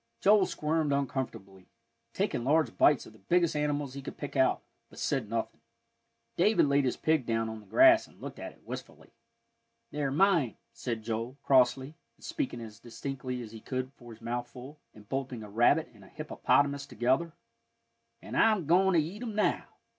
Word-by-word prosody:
Joel 205 -1 +5
squirmed 155 -1 -1
uncomfortably, 115 -9 -3 0.4
taking 120 - -1
large 145 -2 +2
bites 145 -2 +4
of - - -14
the 110 - -19
biggest 170 - +1
animals 145 -2 -1
he 140 - -7
could - - -8
pick 145 - -7
out, 130 -1 +2 0.3
but - - -17
said 125 -7 -1
nothing. 115 0 -3 0.8
David 205 +2 +4
laid 140 -1 +2
his 125 - -1
pig 155 -3 +1
down 115 -1 -1
on 110 0 -6
the 105 - -17
grass, 330 +1 +6
and - - -22
looked - - -8
at - - -6
it - - -25
wistfully. - - -9 0.8
"They're 145 -2 -1
mine," 165 - +2 0.2
said 115 -3 -4
Joel, 115 +4 -4
crossly, 130 +1 +3 0.2
and - - -14
speaking 295 - -3
as 110 -3 -10
distinctly 125 0 -5
as 110 - -10
he 110 - -9
could 130 +3 -4
for 120 -3 -14
his 115 0 -14
mouthful, 120 +4 -6 0.2
and 105 -1 -15
bolting 130 -3 -4
a 105 - -10
rabbit 130 +9 +3
and 105 -3 -17
a - - -15
hippopotamus 145 -2 0
together; 135 +8 0 0.9
"an' - - -9
I'm 215 -7 +3
goin' 185 +5 +4
to - - +6
eat 175 +8 -4
'em 225 -4 -5
now." 210 - +1
135 Hz, 180 wpm, -30 LUFS, 120-155 Hz, 0.9 s, grass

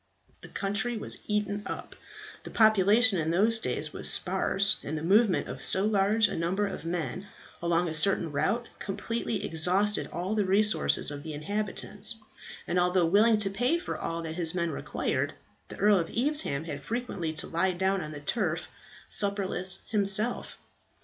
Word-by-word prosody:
The - - -10
country 215 +4 -2
was - - -3
eaten 210 -1 -1
up. - - -7 0.5
The - - -10
population 215 0 +4
in 160 0 -1
those 215 +7 +2
days - - -2
was - - -1
sparse, 200 +2 +1
and 155 +2 -4
the 155 - -6
movement 200 +3 +3
of - - -7
so 190 +2 +1
large 210 +1 +2
a - - -5
number 180 +5 -1
of 195 - -6
men 175 +3 -4 0.3
along 170 +1 +1
a 160 - -4
certain 165 0 +1
route 225 +11 -1
completely 230 +3 -4
exhausted 185 +6 +1
all 180 +4 -3
the 215 -1 +1
resources 190 - +2
of 145 0 -7
the 155 0 -7
inhabitants; 205 +5 -3 0.5
and 180 - 0
although 180 0 +2
willing 215 +6 +4
to 200 -2 +1
pay 245 +11 +1
for 345 - -5
all 165 0 -4
that 160 -1 -5
his 165 0 +1
men 170 -2 -1
required, - - -3 0.3
the - - -10
Earl 205 -1 +4
of 165 - -3
Evesham 255 - +1
had 145 -3 -6
frequently 215 - -4
to 155 - +1
lie 185 +3 0
down 190 +2 0
on 150 - -7
the 145 -1 -8
turf 170 0 -2 0.4
supperless 195 -2 +2
himself. 210 +2 +4
195 Hz, 170 wpm, -28 LUFS, 170-210 Hz, 0.5 s, population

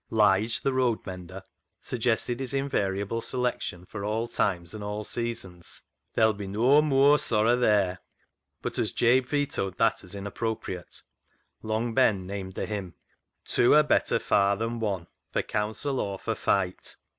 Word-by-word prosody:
Lige, 105 +1 +3
the 135 - +1
road 125 -3 +1
mender, 95 0 -8 0.4
suggested 120 0 -1
his 135 +1 -3
in 135 +1 0
variable 100 -1 -1
selection 125 -9 -2
for 100 +1 -7
all 110 +3 -1
times 90 -7 -1
and 105 0 -4
seasons, 115 -8 -4
" 75 +7 -53
There'll 110 -1 +4
be 100 -1 -6
no 120 +9 +4
mooar 145 0 +5
sorra 110 +2 +3
there," 100 -7 +2 0.6
but - - -2
as - - 0
Jabe 125 +2 +3
vetoed 140 -10 -1
that - - +2
as 90 - -10
inappropriate, 100 -2 -5 0.6
Long 110 +2 -1
Ben 110 -7 +3
named 95 -1 -5
the - - -3
hymn 100 -6 -5 0.3
— - - -54
"Two 120 - +4
are 150 - +7
better 150 - +2
far 100 0 +2
than 115 +2 -2
one. 100 -6 -2 0.3
For - - +1
counsel 110 +6 -2
or 100 -1 -2
for - - -2
fight." 95 -2 -1
110 Hz, 155 wpm, -27 LUFS, 95-120 Hz, 0.6 s, are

